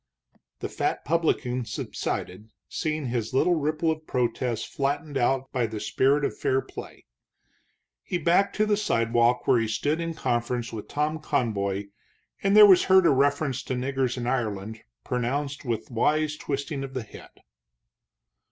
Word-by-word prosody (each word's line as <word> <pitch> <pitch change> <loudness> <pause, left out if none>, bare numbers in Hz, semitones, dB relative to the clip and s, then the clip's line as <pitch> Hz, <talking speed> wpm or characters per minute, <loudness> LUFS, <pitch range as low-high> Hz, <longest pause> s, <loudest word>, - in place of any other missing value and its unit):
The - - -2
fat - - -2
publican 140 -6 0
subsided, 105 -2 -4 0.2
seeing 155 -2 -2
his 120 -1 -2
little 175 +6 +4
ripple 155 +1 0
of 155 0 -6
protest 120 -2 -1
flattened 145 +1 -2
out 135 +1 +1
by 125 -3 0
the 110 0 -5
spirit 140 +6 +2
of - - -2
fair 130 - +1
play. - - -10 1.0
He 180 - -2
backed 180 +4 +2
to 215 - +2
the 210 -1 +2
sidewalk, 120 - +2
where 120 - +5
he 115 - 0
stood 145 +9 -1
in 165 -1 -3
conference 120 -2 -2
with 110 -2 -6
Tom 150 +2 -1
Conboy, 100 -9 -1 0.5
and 195 +1 +3
there 210 - +11
was 190 -3 +6
heard 190 -1 +6
a - - +6
reference 140 -1 +1
to 130 - -4
niggers 130 0 -1
in 120 - -3
Ireland, 110 -4 -2 0.2
pronounced 140 +4 -2
with 115 0 -3
wise 150 +6 +1
twisting 140 -1 -4
of 135 -1 -8
the 130 - -2
head. 110 - -13
135 Hz, 155 wpm, -26 LUFS, 120-155 Hz, 1.0 s, there